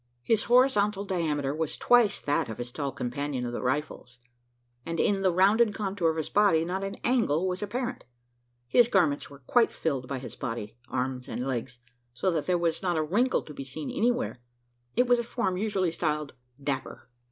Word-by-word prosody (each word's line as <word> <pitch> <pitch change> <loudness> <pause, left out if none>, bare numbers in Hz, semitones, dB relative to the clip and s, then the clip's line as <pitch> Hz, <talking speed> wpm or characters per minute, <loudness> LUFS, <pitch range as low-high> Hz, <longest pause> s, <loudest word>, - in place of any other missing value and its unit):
His 220 - +2
horizontal 210 -5 +3
diameter 155 -7 -1
was 160 0 -3
twice 240 -4 +4
that 145 -4 0
of 110 - -5
his 120 0 -5
tall 140 +1 -3
companion 130 +1 -3
of 120 - -4
the - - -3
rifles; 130 -2 -3 0.7
and 165 +3 -4
in 200 -1 +2
the 190 - +3
rounded 205 +5 +4
contour 195 -5 0
of 160 - -2
his 160 - -2
body, 200 -6 +3
not 190 +3 -2
an 195 0 -4
angle 195 - +2
was 185 +1 -2
apparent. 245 +4 -3 0.6
His 235 - +5
garments 170 -10 +2
were 140 - -12
quite 240 - +3
filled 135 -6 -2
by 135 - -3
his 130 - -8
body, 115 -5 -5
arms 125 0 -2
and 125 - -4
legs 125 -2 -3 0.4
so 155 +10 +1
that 160 -3 -2
there 180 -1 +3
was 170 -1 0
not 175 -3 0
a 155 - +2
wrinkle 225 +12 +1
to 150 - -10
be 140 - -6
seen 135 +2 -6
anywhere. 240 - 0 0.6
It 250 - +4
was 245 -1 +4
a - - -1
form 235 -5 -1
usually 190 -3 0
styled 150 -3 -2 0.3
"dapper." 140 -1 -4
165 Hz, 190 wpm, -28 LUFS, 140-205 Hz, 0.7 s, His